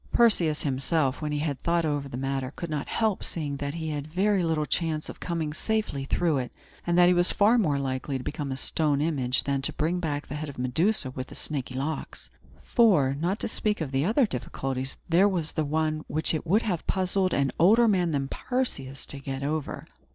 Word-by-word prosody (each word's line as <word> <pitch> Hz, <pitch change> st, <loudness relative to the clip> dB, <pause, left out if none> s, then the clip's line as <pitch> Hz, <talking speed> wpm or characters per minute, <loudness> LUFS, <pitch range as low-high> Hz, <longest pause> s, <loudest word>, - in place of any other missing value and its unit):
Perseus 175 Hz, -10 st, +3 dB
himself, 135 Hz, +1 st, 0 dB
when 150 Hz, -1 st, -2 dB
he 150 Hz, -, -1 dB
had 145 Hz, -3 st, -2 dB
thought 170 Hz, -1 st, +1 dB
over 145 Hz, -2 st, -1 dB
the 125 Hz, -, -5 dB
matter, 135 Hz, 0 st, -2 dB
could 170 Hz, -2 st, -5 dB
not 150 Hz, -2 st, -2 dB
help 220 Hz, -4 st, 0 dB
seeing 145 Hz, -4 st, -3 dB
that 140 Hz, +2 st, -4 dB
he 160 Hz, -1 st, -3 dB
had 145 Hz, -1 st, -3 dB
very 190 Hz, +4 st, +2 dB
little 160 Hz, -3 st, 0 dB
chance 155 Hz, -1 st, -1 dB
of -, -, -9 dB
coming 165 Hz, -4 st, -2 dB
safely 210 Hz, -7 st, -1 dB
through 160 Hz, 0 st, +1 dB
it, 125 Hz, -2 st, -4 dB, 0.4 s
and 175 Hz, 0 st, +2 dB
that 175 Hz, -, +7 dB
he 180 Hz, -, +5 dB
was 175 Hz, 0 st, +3 dB
far 220 Hz, +4 st, +4 dB
more 150 Hz, -9 st, +2 dB
likely 135 Hz, 0 st, -2 dB
to 130 Hz, -, -7 dB
become 145 Hz, -1 st, -4 dB
a 130 Hz, -, -3 dB
stone 145 Hz, +1 st, +1 dB
image 140 Hz, -5 st, +1 dB
than 140 Hz, -1 st, 0 dB
to 135 Hz, -, 0 dB
bring 165 Hz, +4 st, -1 dB
back 150 Hz, -4 st, -2 dB
the -, -, -7 dB
head 150 Hz, 0 st, -4 dB
of 140 Hz, -, -10 dB
Medusa 130 Hz, -, +1 dB
with 130 Hz, 0 st, -6 dB
the -, -, -11 dB
snaky 135 Hz, -4 st, -4 dB
locks. 145 Hz, +4 st, -4 dB, 0.3 s
For, 185 Hz, -, +4 dB
not 180 Hz, +5 st, 0 dB
to -, -, -1 dB
speak 215 Hz, -1 st, -1 dB
of 145 Hz, -5 st, -4 dB
other 200 Hz, -, +3 dB
difficulties, 130 Hz, -, -4 dB
there 180 Hz, +4 st, +5 dB
was 170 Hz, -5 st, -2 dB
one 155 Hz, 0 st, 0 dB
which 155 Hz, +2 st, 0 dB
it 160 Hz, +1 st, -3 dB
would 210 Hz, +7 st, +3 dB
have 180 Hz, -7 st, -2 dB
puzzled 185 Hz, 0 st, +1 dB
an 140 Hz, -1 st, +1 dB
older 220 Hz, +8 st, +6 dB
man 185 Hz, -5 st, +2 dB
than 140 Hz, -3 st, -1 dB
Perseus 140 Hz, -, -3 dB
to 140 Hz, -, -6 dB
get 135 Hz, 0 st, -5 dB
over. 150 Hz, +1 st, -3 dB
155 Hz, 210 wpm, -27 LUFS, 140-175 Hz, 0.4 s, that